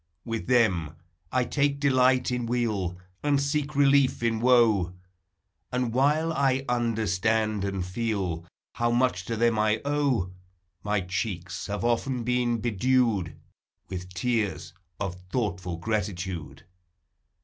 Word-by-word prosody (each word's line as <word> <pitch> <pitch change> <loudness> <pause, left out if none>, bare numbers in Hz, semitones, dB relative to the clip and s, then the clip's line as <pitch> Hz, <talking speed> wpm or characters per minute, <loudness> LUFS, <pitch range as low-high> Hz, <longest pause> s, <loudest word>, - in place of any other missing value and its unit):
With 115 -1 -4
them 95 - +2 0.4
I 130 -1 +2
take 140 +1 0
delight 130 -2 +3
in 125 -1 -1
weal, 105 -7 -1 0.2
And 145 -1 +2
seek 145 +1 -1
relief 140 -3 +4
in 115 -1 +1
woe; 110 -7 +4 0.8
And 125 -2 -1
while 150 +5 +2
I 135 -2 +1
understand 110 -3 +1
and 95 -2 -2
feel 95 -4 -2 0.3
How 120 0 0
much 120 -7 +1
to 115 - -2
them 115 0 +2
T 105 0 +3
owe. 140 -10 +1 0.5
My 105 -1 0
cheeks 90 -1 -4
have 105 +3 -3
often 120 +1 0
been 120 0 +1
bedewed 115 -4 +1 0.5
With 90 -1 -6
tears 110 -2 -1 0.3
of 90 -3 -4
thoughtful 95 -6 -2
gratitude. 90 -6 -3
115 Hz, 120 wpm, -27 LUFS, 95-125 Hz, 0.8 s, relief